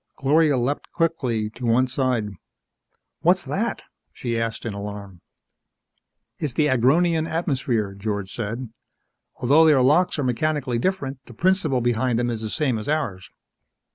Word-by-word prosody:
Gloria 145 +1 +3
leapt 125 +4 -2
quickly 125 -11 -1
to 125 - -11
one 120 +2 +3
side. 125 -4 -1 0.9
"What's - - +2
that?" - - -2 0.3
she 115 -2 -3
asked, 115 0 -3
in 115 - -3
alarm. 100 -3 -7 1.2
"It's 145 -5 -2
the 150 +2 +2
Agronian 160 +6 +3
atmosphere," 130 - -1
George 100 -1 -4
said. 115 +2 -4 0.7
"Although 145 +6 +4
their 140 -5 +5
locks 160 +8 +3
are 145 - -1
mechanically 130 -1 0
different, 140 -5 -2
the 120 - -12
principle 165 - +2
behind 120 0 +1
them 120 0 0
is 115 -2 -4
the 110 - -4
same 130 -3 0
as 105 - -6
ours." 105 -12 -2
125 Hz, 140 wpm, -23 LUFS, 115-150 Hz, 1.2 s, their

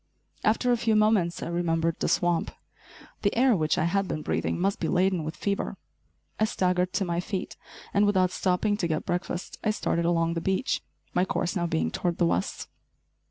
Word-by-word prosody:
After 230 +3 +2
a 240 - +3
few 225 -1 +1
moments 215 -5 +2
I - - -4
remembered 165 -1 0
the - - 0
swamp. 175 -1 +1 0.7
The 200 +2 0
air 250 -1 +5
which 155 -3 +1
I - - +2
had 195 +3 +1
been 155 -3 -3
breathing - - -1
must 195 +2 0
be - - -1
laden 185 -2 +2
with 155 +2 -5
fever. 200 -1 -2 0.6
I 215 - +4
staggered 180 -3 +1
to 195 - 0
my 170 -1 -1
feet 190 +1 -4 0.4
and, 205 +1 +4
without 185 -3 +3
stopping 195 +3 +1
to 175 - 0
get 155 -1 -2
breakfast, 175 0 -3
I - - +1
started 170 -5 0
along 165 -1 +2
the 165 - -2
beach, 190 +9 0 0.3
my 180 - +3
course 185 0 -1
now 175 -2 0
being 80 - 0
toward 175 - -1
the 175 - +3
west. 190 - -1
180 Hz, 195 wpm, -27 LUFS, 170-200 Hz, 0.7 s, air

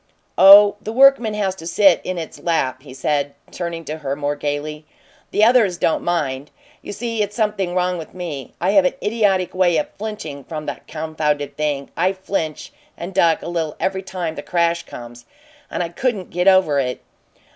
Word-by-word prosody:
"Oh, 200 +1 +9
the 215 - -5
workman 245 -3 +5
has 200 -3 0
to 165 - -8
sit 195 -1 +4
in 185 -1 -4
its 165 -2 -7
lap," 130 -7 -1
he 140 -1 -13
said, 140 +2 -1 0.2
turning 170 -2 -5
to 155 +1 -5
her 140 -2 -3
more 145 0 -2
gaily. 150 +1 -4 0.5
"The 210 - +1
others 220 -6 +4
don't 165 - +1
mind. 145 -5 -2 0.3
You - - -8
see, 230 +1 -3
it's 205 0 -2
something 210 -5 -1
wrong 180 -1 0
with 160 +2 -10
me. 155 -8 -6
I 180 +3 +1
have 195 -2 +5
an 180 - 0
idiotic 205 -4 +1
way 180 -3 +2
of 150 - -2
flinching 200 -10 -6
from 155 +1 -6
the - - -5
confounded 155 -2 -2
thing 145 -2 -2
I 185 +3 +1
flinch 190 -5 -4 0.2
and 175 +3 -7
duck 170 -3 +3
a - - -6
little 165 -3 -2
every 190 0 -1
time 180 -4 -4
the - - -7
crash 170 -1 0
comes, 120 0 -10 0.4
and - - -2
I 170 - -4
couldn't 205 0 -2
get 180 +2 0
over 185 -7 +5
it. 125 -2 -2
170 Hz, 190 wpm, -20 LUFS, 150-195 Hz, 0.5 s, Oh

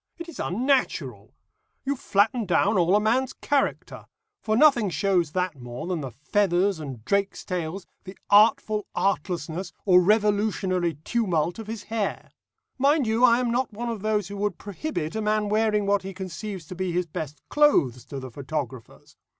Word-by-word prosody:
It 340 0 -8
is 335 - -10
unnatural. 255 +8 -1 0.5
You 280 +1 0
flatten 220 -1 +1
down 200 +4 +2
all 180 +1 +3
a - - +5
man's 235 +5 +1
character; 285 -1 -2 0.4
for 215 0 0
nothing 270 -8 +5
shows 180 -4 +1
that 180 -7 -2
more 120 +3 -7
than 175 -3 -2
the 135 - -5
feathers 180 - +1
and 130 -7 -8
drakes' 200 +2 0
tails, 180 +1 -4 0.2
the 190 +1 -10
artful 215 0 +4
artlessness, 175 -1 -2
or 180 -2 +6
revolutionary 200 -4 +1
tumult 180 -6 0
of 220 - -7
his 220 -1 -6
hair. 220 -3 -3 0.5
Mind 285 +1 +3
you, 225 +2 +1
I 240 -1 +6
am 245 -2 0
not 245 -1 -1
one 235 +3 -4
of 225 -4 -4
those 210 -2 0
who 200 +1 -7
would 205 -2 -1
prohibit 205 - -4
a 220 - -1
man 210 -1 0
wearing 210 -1 +2
what 200 0 +2
he 190 0 -8
conceives 190 -1 -6
to 185 - -6
be 185 0 -2
his 180 +1 0
best 155 -2 -6
clothes 155 - +3
to 140 - -6
the 130 -1 -8
photographer's. 130 -3 -6
200 Hz, 170 wpm, -25 LUFS, 175-220 Hz, 0.5 s, or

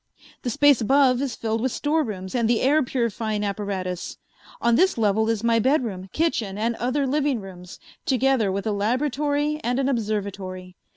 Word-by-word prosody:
The 245 - -2
space 290 +1 +4
above 260 +1 +3
is 265 -5 -2
filled 225 0 -2
with 260 +1 0
storerooms 230 -13 -2
and 235 -3 +1
the 235 - +2
air 295 +4 +4
purifying 230 -4 -2
apparatus. 195 -3 -4 0.4
On 235 - +2
this 375 +3 +3
level 220 0 +2
is 225 -1 -1
my 230 -1 +3
bedroom, 225 -8 0
kitchen, 230 -12 -1
and 230 +2 0
other 255 +4 0
living 280 -2 0
rooms, 180 -2 -10 0.3
together 260 -5 +2
with 195 +2 -3
a 220 - 0
laboratory 290 +7 0
and 245 +1 0
an 270 -1 +1
observatory. 200 -6 -3
230 Hz, 165 wpm, -24 LUFS, 205-270 Hz, 0.4 s, space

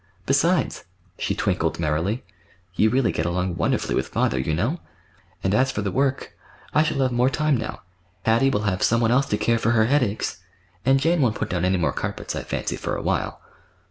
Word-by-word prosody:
Besides,"—she - - -1
twinkled - - 0
merrily—"you 90 +3 -2
really 125 -1 +2
get 80 - -1
along 90 0 -1
wonderfully - - 0
with - - 0
father, 65 - 0
you 65 +5 -1
know. 120 - -1 0.6
And, 95 - +1
as 130 +4 +3
for 105 - -3
the 100 - -1
work—I 135 +3 -2
shall 155 -3 0
have 130 -1 +2
more 125 +2 +3
time 150 +2 +1
now: 115 -3 -5 0.4
Hattie 115 +4 +4
will 105 -6 0
have 95 -3 -1
some 115 - +3
one 115 -1 +2
else 135 +2 +3
to 105 - 0
care 115 +1 +1
for 115 +1 +2
her 110 -1 +4
headaches, 125 -5 0 0.5
and 135 +2 +4
Jane 165 +3 +2
won't 120 -5 +2
put 110 - -3
down 90 0 0
any 95 +1 +2
more 80 -3 0
carpets, - - -4
I - - -2
fancy, - - -3
for - - -3
a - - -4
while." - - -1
115 Hz, 195 wpm, -23 LUFS, 95-135 Hz, 0.6 s, Hattie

